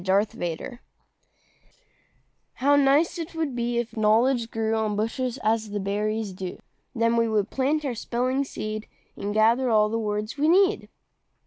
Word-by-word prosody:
EASY 195 +3 +1
KNOWLEDGE 175 +9 -5 1.7
How 285 +2 +3
nice 285 +5 +3
'twould 320 -4 -4
be 240 0 -1
if 235 -1 -3
knowledge 230 +3 +2
grew 225 -1 -1
On 220 -2 0
bushes, 240 +4 -2
as 220 0 +1
the 205 0 -3
berries 210 +1 -2
do! 185 -1 -6 0.4
Then 230 0 +2
we 230 0 +3
could 215 -1 0
plant 290 +3 0
our 265 - -1
spelling 250 +4 -1
seed, 215 -5 -5 0.3
And 205 - -4
gather 230 +4 +3
all 210 -2 +4
the 225 +1 -1
words 210 +3 -3
we 300 - +3
need. 390 +4 +3
230 Hz, 150 wpm, -25 LUFS, 215-260 Hz, 1.7 s, all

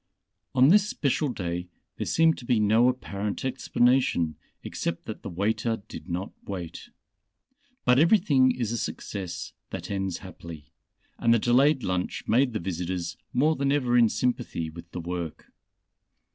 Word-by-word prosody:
On 130 +2 +6
this 205 +3 +5
special 145 -2 0
day 90 -5 -4 0.3
there - - -3
seemed 165 0 +4
to 120 - -10
be 120 -2 +2
no 110 +4 +4
apparent 105 -4 -3
explanation 125 -9 +2 0.3
except - - -4
that - - -6
the - - -6
waiter 110 +4 -1
did 85 - -9
not 90 +3 -3
wait. 90 -4 -7 1.0
But 125 +1 +5
everything 155 -7 +5
is 120 -3 -1
a 120 - -1
success 90 -3 -5 0.2
that - - -6
ends 95 -3 -2
happily, 85 -5 -11 0.5
and 115 - +3
the 115 - +6
delayed 130 +4 +3
lunch 90 -2 -2
made 125 +3 +3
the 110 - -1
visitors 90 -1 -3 0.2
more 150 +6 +3
than 140 -1 0
ever 125 -4 +2
in 120 -2 +6
sympathy 120 -11 -1
with 85 +1 -11
the 90 - -6
Work. 85 -1 -5
110 Hz, 150 wpm, -27 LUFS, 90-130 Hz, 1.0 s, On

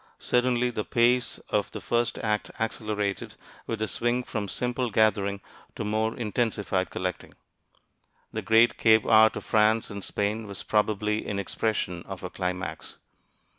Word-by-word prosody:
Certainly 125 0 +1
the 110 -3 -2
pace 120 +2 +2
of - - 0
the - - -7
first 120 0 0
act 105 -1 -1
accelerated 105 -3 -2 0.3
with 115 - -2
the 110 0 -2
swing 120 +3 0
from 105 -4 -4
simple 125 +5 -1
gathering 100 -2 +2 0.3
to - - -4
more 110 +1 0
intensified 105 -4 -1
collecting. 90 -2 -4 1.0
The - - -2
great 115 +1 +4
cave 110 -1 +5
art 110 0 +6
of - - -6
France 110 +1 +2
and 100 -1 -6
Spain 105 +2 -2
was 100 -2 -7
probably 105 0 0
an 100 - -2
expression 100 -3 -2
of 95 -2 -7
a 90 - -5
climax. 90 0 -4
110 Hz, 145 wpm, -27 LUFS, 100-115 Hz, 1.0 s, art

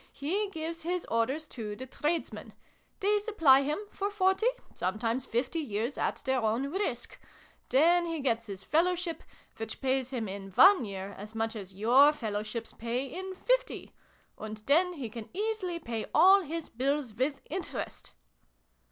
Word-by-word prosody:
He 390 +9 -1
gives 330 -2 -5
his 355 +2 -2
orders 260 +7 0
to 215 -4 -5
the 260 - -7
tradesmen: 305 +5 -3 0.5
they 415 +2 +3
supply 325 -11 +5
him, 295 +2 -1
for 400 +1 -2
forty, 385 +2 +2 0.3
some 185 +3 -2
times 235 +3 -1
fifty, 250 +8 -1
years, 235 -2 -2
at - - -2
their 265 -1 +2
own 230 +6 0
risk: 390 +4 -3 0.5
then 340 +6 +4
he 330 -1 -2
gets 230 -4 0
his 195 -1 -6
Fellowship 345 - +1 0.4
which 225 0 -5
pays 260 -1 0
him 240 -5 -3
in 195 0 -6
one 380 - +7
year 195 0 -6
as 210 +2 -9
much 225 0 -1
as 195 -3 -8
your 250 +8 +6
Fellowships 215 -2 -4
pay 235 +3 -2
in 375 +7 -6
fifty - - -1 0.5
and 215 0 -6
then 350 +6 +4
he 275 -8 -5
can 220 0 -8
easily 410 -4 -1
pay 230 -8 -4
all 380 +5 +7
his 330 -1 -5
bills, 270 0 -1
with 265 +5 -1
interest." - - -5
275 Hz, 160 wpm, -30 LUFS, 225-345 Hz, 0.5 s, one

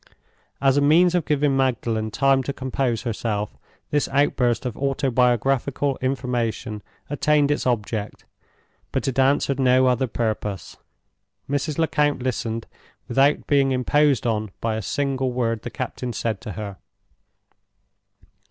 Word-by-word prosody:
As 135 0 +3
a - - +4
means 170 +5 +5
of 175 -3 +1
giving 145 -2 +1
Magdalen 115 -4 0
time 135 +4 +3
to 140 +2 -4
compose 130 -3 -2
herself, 110 -3 -2 0.4
this 145 -1 +1
outburst 130 -3 +1
of 125 - -3
autobiographical 135 0 +1
information 120 -4 -2 0.3
attained 145 0 +2
its 145 - 0
object, 110 -3 -2 0.7
but - - -1
it 135 0 -1
answered 140 0 +2
no 130 0 +4
other 130 +1 +2
purpose. 105 -5 -3 0.7
Mrs. 145 +2 -2
Lecount 150 -3 +1
listened, 115 -2 -2 0.4
without 140 +2 +2
being 140 -2 +3
imposed 135 0 +2
on 110 -2 0
by 115 -1 -1
a 110 - -3
single 135 +3 -1
word 115 -3 -1
the 120 - -6
captain 125 0 -5
said 110 -2 -2
to 105 -5 -6
her. 100 -2 -6
130 Hz, 130 wpm, -23 LUFS, 115-140 Hz, 0.7 s, means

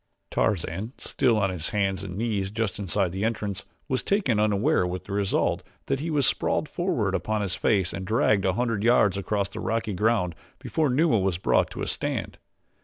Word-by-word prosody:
Tarzan, 100 +4 -1
still 125 -5 +1
on 100 -2 +1
his 85 -3 -2
hands 100 -2 0
and 95 -1 -6
knees 105 -4 -1
just 110 -1 -2
inside 95 -1 0
the 95 +3 -3
entrance, 105 -4 -2 0.2
was 130 - 0
taken 190 - +1
unaware 105 - +2
with 90 +1 -4
the 100 - -7
result 100 -1 +1 0.2
that 135 - -1
he 160 +4 -3
was 145 -4 +2
sprawled - - +1
forward - - -1
upon 110 -1 -1
his 95 -3 -1
face 95 -4 +1
and 95 - -4
dragged 105 0 +2
a 95 - +2
hundred 115 -1 -1
yards 115 -5 +4
across 100 0 -1
the 110 - -7
rocky 110 -1 -1
ground 95 -3 +1 0.2
before 155 -3 0
Numa 140 -2 +3
was 95 -2 0
brought 90 - +2
to - - -4
a - - -2
stand. - - -2
105 Hz, 190 wpm, -26 LUFS, 95-115 Hz, 0.2 s, yards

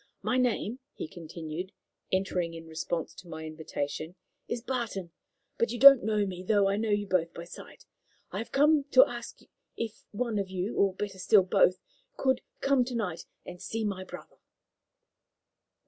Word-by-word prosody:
My 250 - +1
name," 245 -1 0 0.2
he - - -5
continued, 165 +2 -7 0.4
entering 180 -3 0
in 165 0 -9
response 160 +1 -3
to 185 - -13
my 160 -1 -7
invitation, 155 +1 -5 0.3
"is 235 - -2
Barton, 230 -9 -3 0.5
but 230 - +2
you 240 - -3
don't 275 0 +10
know 210 -1 +1
me, 185 -2 -5
though 200 +1 +3
I 195 - +2
know 220 +1 -1
you 205 0 +1
both 170 -4 0
by 170 - -6
sight. 170 - -12 0.5
I - - -3
have 230 - -6
come 295 0 +4
to 260 +1 +9
ask 240 -3 -8
you - - -21 0.3
if 225 -1 -5
one 220 0 -1
of 195 -1 -2
you 190 +4 -3
or, 195 -2 +2
better 195 -1 -5
still, 195 +1 +5
both 185 0 +4 0.4
could 260 -1 +2 0.2
come 275 -2 +4
to 250 0 -5
night 185 -8 -3 0.2
and 180 0 -9
see 225 0 -3
my 195 -2 -2
brother." 185 - -11
195 Hz, 175 wpm, -29 LUFS, 175-230 Hz, 0.5 s, don't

